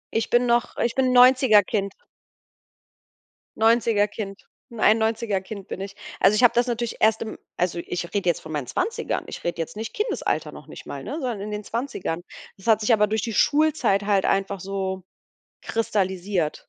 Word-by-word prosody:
Ich 225 Hz, -, 0 dB
bin 240 Hz, +1 st, +3 dB
noch 240 Hz, 0 st, +1 dB
ich 235 Hz, -, 0 dB
bin 265 Hz, -, +1 dB
'n -, -, +2 dB
90er- 250 Hz, -4 st, +6 dB
Kind. 200 Hz, 0 st, -2 dB, 1.6 s
90er- 225 Hz, -2 st, +3 dB
Kind, 200 Hz, -2 st, -8 dB, 0.3 s
91er- 220 Hz, -1 st, +2 dB
Kind 195 Hz, 0 st, -9 dB
bin 190 Hz, -, -6 dB
ich. 195 Hz, 0 st, -7 dB, 0.2 s
Also, 195 Hz, +2 st, +5 dB
ich 215 Hz, -, +2 dB
habe 245 Hz, -, +7 dB
das 240 Hz, +1 st, +3 dB
natürlich 240 Hz, -1 st, -3 dB
erst 220 Hz, 0 st, +3 dB
im 220 Hz, -, -5 dB, 0.2 s
also, 175 Hz, -1 st, 0 dB
ich 175 Hz, 0 st, -3 dB
rede 200 Hz, -3 st, -1 dB
jetzt 170 Hz, -, +2 dB
von 160 Hz, -, -10 dB
meinen 145 Hz, -4 st, -3 dB
20ern. 455 Hz, -, -2 dB
Ich -, -, -8 dB
rede 170 Hz, -1 st, -2 dB
jetzt 165 Hz, -, -6 dB
nicht 220 Hz, 0 st, -5 dB
Kindesalter 425 Hz, +3 st, -2 dB
noch -, -, -12 dB
nicht -, -, -11 dB
mal, -, -, -6 dB
ne, -, -, -6 dB
sondern 245 Hz, -8 st, -3 dB
in 210 Hz, +1 st, -5 dB
den 210 Hz, 0 st, -4 dB
20ern. 225 Hz, -8 st, -3 dB, 0.4 s
Das 190 Hz, -, -16 dB
hat 220 Hz, -1 st, +4 dB
sich 210 Hz, -, +1 dB
aber 210 Hz, -2 st, +5 dB
durch 215 Hz, 0 st, -1 dB
die 225 Hz, +2 st, -3 dB
Schulzeit 290 Hz, -8 st, +2 dB
halt 200 Hz, -2 st, +2 dB
einfach 195 Hz, 0 st, 0 dB
so 190 Hz, 0 st, -4 dB, 0.6 s
kristallisiert. 190 Hz, -6 st, -1 dB
210 Hz, 185 wpm, -24 LUFS, 195-235 Hz, 1.6 s, habe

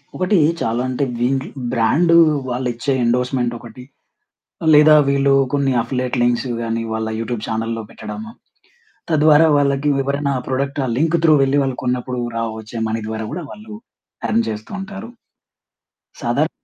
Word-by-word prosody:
ఒకటి 185 Hz, +1 st, +1 dB, 0.2 s
చాలా 115 Hz, +2 st, 0 dB
అంటే 130 Hz, +2 st, -1 dB, 0.2 s
వీండ్లు 130 Hz, +2 st, 0 dB, 0.2 s
బ్రాండు 140 Hz, +9 st, +3 dB, 0.3 s
వాళ్ళు 125 Hz, +1 st, -2 dB
ఇచ్చే 120 Hz, +4 st, -2 dB
ఎండోర్స్‌మెంట్ 125 Hz, 0 st, 0 dB
ఒకటి. 120 Hz, +2 st, -12 dB, 0.9 s
లేదా 150 Hz, +1 st, +7 dB
వీళ్ళు 140 Hz, 0 st, +3 dB, 0.2 s
కొన్ని 140 Hz, -1 st, +1 dB
అఫిలియేట్ 125 Hz, +1 st, -3 dB
లింక్సు 120 Hz, +1 st, +1 dB
గాని 115 Hz, 0 st, -2 dB
వాళ్ళ 110 Hz, 0 st, -2 dB
యూట్యూబ్ 115 Hz, 0 st, -3 dB
చానెల్‌‌లో 115 Hz, 0 st, -2 dB
పెట్టడము. 225 Hz, -, -8 dB, 0.8 s
తద్వారా 155 Hz, +1 st, +5 dB
వాళ్ళకి 140 Hz, 0 st, +1 dB
ఎవరైనా 140 Hz, 0 st, -1 dB
ప్రొడక్ట్ 140 Hz, +2 st, -2 dB
ఆ -, -, -3 dB
లింక్ 165 Hz, +3 st, +2 dB
త్రూ 160 Hz, -2 st, +6 dB
వెళ్ళి 135 Hz, +1 st, +2 dB
వాళ్లు 135 Hz, -2 st, -3 dB
కొన్నప్పుడు 125 Hz, 0 st, -2 dB, 0.2 s
రా 115 Hz, -, -1 dB, 0.2 s
వచ్చే 110 Hz, +1 st, -7 dB
మనీ 110 Hz, 0 st, -2 dB
ద్వారా 110 Hz, 0 st, -4 dB
గూడా 175 Hz, -, -5 dB
వాళ్ళు 215 Hz, 0 st, -11 dB, 0.6 s
ఎర్న్ 115 Hz, +1 st, +2 dB
జేస్తూ 110 Hz, 0 st, -7 dB
ఉంటారు. 200 Hz, +3 st, -8 dB, 1.1 s
సాదర్ -, -, 0 dB
130 Hz, 140 wpm, -19 LUFS, 115-145 Hz, 1.1 s, లేదా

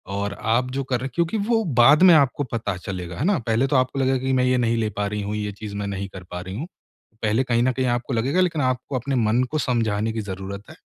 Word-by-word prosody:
और 100 Hz, 0 st, -2 dB
आप 120 Hz, +3 st, +1 dB
जो 135 Hz, +1 st, -2 dB
कर 125 Hz, -2 st, -1 dB
रहे 130 Hz, +2 st, -4 dB
क्योंकि 170 Hz, +4 st, 0 dB
वो 230 Hz, -1 st, +2 dB, 0.2 s
बाद 145 Hz, +8 st, +7 dB
में 185 Hz, -2 st, +9 dB
आपको 145 Hz, -1 st, +3 dB
पता 110 Hz, -4 st, -2 dB
चलेगा, 90 Hz, -2 st, -6 dB
है -, -, -2 dB
ना? 200 Hz, 0 st, +3 dB
पहले 115 Hz, +2 st, +1 dB
तो 140 Hz, -, 0 dB
आपको 130 Hz, +1 st, +1 dB
लगेगा 130 Hz, 0 st, +2 dB
कि 130 Hz, +1 st, -1 dB
मैं 130 Hz, -1 st, +3 dB
ये 125 Hz, 0 st, +2 dB
नहीं 115 Hz, -1 st, +1 dB
ले 110 Hz, -1 st, 0 dB
पा 105 Hz, 0 st, 0 dB
रही 105 Hz, +1 st, -3 dB
हूँ, 100 Hz, +1 st, -3 dB
ये 105 Hz, -1 st, -3 dB
चीज़ 100 Hz, +1 st, -8 dB
मैं 100 Hz, 0 st, -3 dB
नहीं 100 Hz, 0 st, -4 dB
कर 95 Hz, -, -9 dB
पा 90 Hz, -, -5 dB
रही 95 Hz, +1 st, -7 dB
हूँ। 145 Hz, +10 st, -5 dB, 0.6 s
पहले 110 Hz, +4 st, +2 dB
कहीं 120 Hz, -2 st, +1 dB
न 130 Hz, -, +3 dB
कहीं 130 Hz, +1 st, -1 dB
आपको 120 Hz, +2 st, -4 dB
लगेगा 130 Hz, +10 st, +1 dB
लेकिन 170 Hz, -4 st, +1 dB
आपको 130 Hz, +1 st, -1 dB
अपने 135 Hz, +3 st, -2 dB
मन 115 Hz, +1 st, +2 dB
को 155 Hz, -, 0 dB
समझाने 115 Hz, -4 st, 0 dB
की 110 Hz, -, -2 dB
ज़रूरत 100 Hz, 0 st, -6 dB
है। -, -, -11 dB
120 Hz, 270 wpm, -23 LUFS, 105-135 Hz, 0.6 s, में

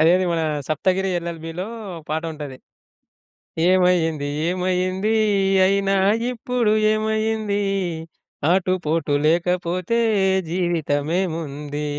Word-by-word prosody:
అదేది 180 Hz, +4 st, +4 dB
మన 165 Hz, -, 0 dB, 0.3 s
సప్తగిరి 185 Hz, +5 st, +1 dB
ఎల్‌ఎల్‌బీ‌లో 170 Hz, +2 st, -5 dB, 0.3 s
ఒక 160 Hz, -, -9 dB
పాట 160 Hz, +1 st, -1 dB
ఉంటది. 145 Hz, -4 st, -7 dB, 1.1 s
ఏమైంది? 170 Hz, -5 st, +2 dB, 0.2 s
ఏమయ్యింది? 185 Hz, +3 st, 0 dB, 0.5 s
అయినా 195 Hz, 0 st, +2 dB, 0.4 s
ఇప్పుడు 240 Hz, -2 st, 0 dB, 0.2 s
ఏమయ్యింది? 215 Hz, -1 st, 0 dB, 0.9 s
ఆటుపోటు 165 Hz, -5 st, 0 dB
లేకపోతే 180 Hz, +5 st, 0 dB, 0.5 s
జీవితం 165 Hz, -5 st, 0 dB
ఏముంది? 150 Hz, -4 st, -4 dB
180 Hz, 80 wpm, -22 LUFS, 160-195 Hz, 1.1 s, అదేది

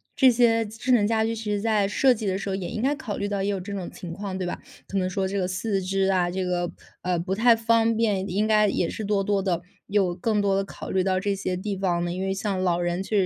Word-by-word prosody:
这 265 Hz, -, +6 dB
些 230 Hz, -1 st, +3 dB
智 225 Hz, +4 st, -3 dB
能 220 Hz, -4 st, +5 dB
家 220 Hz, -1 st, +2 dB
居， 225 Hz, 0 st, -1 dB
其 220 Hz, -1 st, -4 dB
实 205 Hz, -, 0 dB
在 210 Hz, -2 st, +2 dB
设 255 Hz, +6 st, +4 dB
计 215 Hz, -3 st, -4 dB
的 190 Hz, 0 st, 0 dB
时 200 Hz, -, -5 dB
候 190 Hz, -, -1 dB
也 180 Hz, -3 st, -4 dB
应 215 Hz, -, -4 dB
该 275 Hz, +4 st, +2 dB
考 245 Hz, -9 st, -5 dB
虑 200 Hz, -, -2 dB
到 200 Hz, -1 st, -2 dB
也 195 Hz, -, 0 dB
有 200 Hz, -1 st, -1 dB
这 200 Hz, +2 st, -6 dB
种 190 Hz, -3 st, -4 dB
情 170 Hz, -2 st, -8 dB
况， 195 Hz, 0 st, -5 dB
对 185 Hz, -, -2 dB
吧？ -, -, -4 dB, 0.3 s
可 195 Hz, -, -3 dB
能 185 Hz, -1 st, +1 dB
说 190 Hz, +1 st, -1 dB
这 200 Hz, +1 st, -3 dB
个 180 Hz, -, 0 dB
四 195 Hz, +2 st, -1 dB
肢 195 Hz, +1 st, 0 dB
啊， 185 Hz, -2 st, +2 dB
这 185 Hz, +1 st, -2 dB
个， 175 Hz, -1 st, -1 dB, 0.3 s
呃， 180 Hz, -1 st, 0 dB
不 185 Hz, +3 st, -2 dB
太 230 Hz, +3 st, +5 dB
方 225 Hz, 0 st, +2 dB
便 205 Hz, -4 st, +1 dB
应 205 Hz, +4 st, +1 dB
该 215 Hz, -1 st, +4 dB
也 170 Hz, -, 0 dB
是 220 Hz, -, -5 dB
多 200 Hz, -1 st, +1 dB
多 200 Hz, 0 st, +1 dB
地 180 Hz, -3 st, 0 dB, 0.3 s
有 195 Hz, -4 st, +1 dB
更 210 Hz, +3 st, 0 dB
多 200 Hz, -1 st, +2 dB
地 195 Hz, -, +1 dB
考 195 Hz, -, -8 dB
虑 190 Hz, -1 st, +2 dB
到 185 Hz, 0 st, +1 dB
这 200 Hz, 0 st, -1 dB
些 185 Hz, -2 st, -2 dB
地 200 Hz, +2 st, -3 dB
方 175 Hz, -3 st, 0 dB
呢。 175 Hz, -, -2 dB
因 185 Hz, -, -4 dB
为 190 Hz, 0 st, 0 dB
像 195 Hz, -1 st, -2 dB
老 175 Hz, -2 st, +2 dB
人 175 Hz, +1 st, -1 dB
确 210 Hz, +2 st, -1 dB
195 Hz, 310 characters per minute, -25 LUFS, 185-215 Hz, 0.3 s, 这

